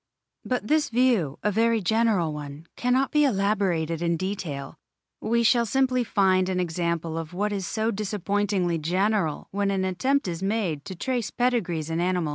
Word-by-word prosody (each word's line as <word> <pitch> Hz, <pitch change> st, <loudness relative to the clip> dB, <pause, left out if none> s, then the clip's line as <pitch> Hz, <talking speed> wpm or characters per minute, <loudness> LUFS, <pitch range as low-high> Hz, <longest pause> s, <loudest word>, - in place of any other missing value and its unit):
But 250 Hz, -4 st, -2 dB
this 305 Hz, +4 st, +2 dB
view, 230 Hz, -, +2 dB
a 210 Hz, -, +2 dB
very 225 Hz, +2 st, +2 dB
general 210 Hz, -5 st, +1 dB
one, 145 Hz, +1 st, -8 dB
cannot 255 Hz, +2 st, +1 dB
be 300 Hz, 0 st, +4 dB
elaborated 195 Hz, -, +1 dB
in 170 Hz, -1 st, +1 dB
detail; 165 Hz, -7 st, -4 dB, 0.5 s
we 235 Hz, +1 st, +1 dB
shall 235 Hz, 0 st, +3 dB
simply 255 Hz, +1 st, +2 dB
find 190 Hz, -4 st, +2 dB
an 185 Hz, -1 st, 0 dB
example 170 Hz, -1 st, -2 dB
of 165 Hz, +2 st, -7 dB
what 205 Hz, +2 st, -1 dB
is 195 Hz, -3 st, -3 dB
so 220 Hz, +1 st, 0 dB
dis 210 Hz, -1 st, -4 dB
appointingly 200 Hz, -4 st, 0 dB
general 185 Hz, 0 st, 0 dB
when 200 Hz, 0 st, 0 dB
an 190 Hz, -1 st, 0 dB
attempt 260 Hz, +8 st, 0 dB
is 170 Hz, -1 st, -4 dB
made 195 Hz, -7 st, -1 dB
to 190 Hz, -, -6 dB
trace 245 Hz, +4 st, -2 dB
pedigrees 180 Hz, -11 st, -1 dB
in 165 Hz, -, -1 dB
animals. 180 Hz, -3 st, 0 dB
195 Hz, 170 wpm, -25 LUFS, 170-225 Hz, 0.5 s, be